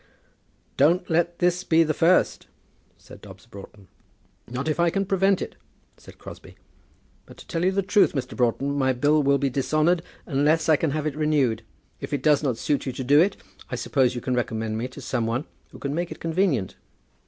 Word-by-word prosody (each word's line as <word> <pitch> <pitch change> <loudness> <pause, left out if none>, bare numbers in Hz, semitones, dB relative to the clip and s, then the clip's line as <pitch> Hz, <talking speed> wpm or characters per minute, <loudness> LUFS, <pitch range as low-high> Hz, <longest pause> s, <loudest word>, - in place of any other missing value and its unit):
"Don't 170 +6 +2
let 170 +1 +1
this 180 0 +1
be 165 -2 +4
the 155 -1 -1
first," 170 +4 +2 0.5
said - - -15
Dobbs - - -13
Broughton. 100 0 -13 0.6
"Not 125 +5 -4
if 155 +1 -1
I 170 0 +4
can 195 +3 -1
prevent 195 0 +2
it," - - -9 0.4
said - - -16
Crosbie. - - -12 0.7
"But, - - -15
to - - -13
tell 165 -1 -2
you 185 - +3
the 195 +1 0
truth, 200 +1 +3
Mr. 130 -4 -4
Broughton, 130 +3 0
my 130 -2 +1
bill 145 +4 +2
will 140 0 +3
be 140 -1 -1
dishonoured 155 +6 +1 0.2
unless 150 +3 +1
I 160 - +5
can 160 +2 0
have 150 +1 -2
it 150 -2 -2
renewed. 145 -7 +1 0.4
If - - -7
it 140 -2 -2
does 150 -2 +4
not 130 -6 -1
suit 145 +3 -1
you - - -1
to 130 - -5
do 145 +4 +5
it, 190 +4 +2 0.3
I 125 - -3
suppose 125 +1 +1
you 120 - -4
can 130 - -2
recommend 110 -2 -2
me 115 +3 -3
to 130 +2 -12
some 115 -2 -2
one 120 +6 -2 0.2
who - - -13
can 140 0 -4
make 170 +2 -2
it - - -8
convenient." 165 - -1
145 Hz, 205 wpm, -24 LUFS, 125-165 Hz, 0.7 s, I